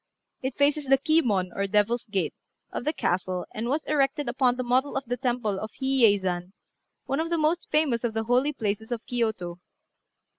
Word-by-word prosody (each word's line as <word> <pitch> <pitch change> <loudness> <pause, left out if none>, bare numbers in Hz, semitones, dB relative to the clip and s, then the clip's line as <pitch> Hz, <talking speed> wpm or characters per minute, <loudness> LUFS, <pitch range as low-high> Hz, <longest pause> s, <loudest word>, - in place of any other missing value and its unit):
It 260 0 -3
faces 290 +1 +2
the 270 0 +5
Ki 315 +4 +3
mon, 190 - 0
or 200 0 -1
Devil's 220 +4 +1
Gate, 200 -3 -1 0.4
of - - -4
the 305 - +2
castle, 180 - -1
and 230 +2 -3
was 295 +3 0
erected 285 -1 +1
upon 250 0 +2
the 255 - -2
model 255 +3 +1
of 270 0 -2
the 245 +1 -1
temple 240 -5 -1
of 215 - -5
Hi 265 - -6
yei 245 -6 +5
zan, 180 -1 -3 0.5
one 275 +2 -1
of 325 +1 -1
the 340 - +1
most 320 +3 +1
famous 285 -7 +2
of 230 -2 -1
the 225 - 0
holy 250 +5 +2
places 220 -3 -3
of 240 -1 -3
Kiyôto. 220 -8 -2
245 Hz, 200 wpm, -26 LUFS, 210-275 Hz, 0.5 s, the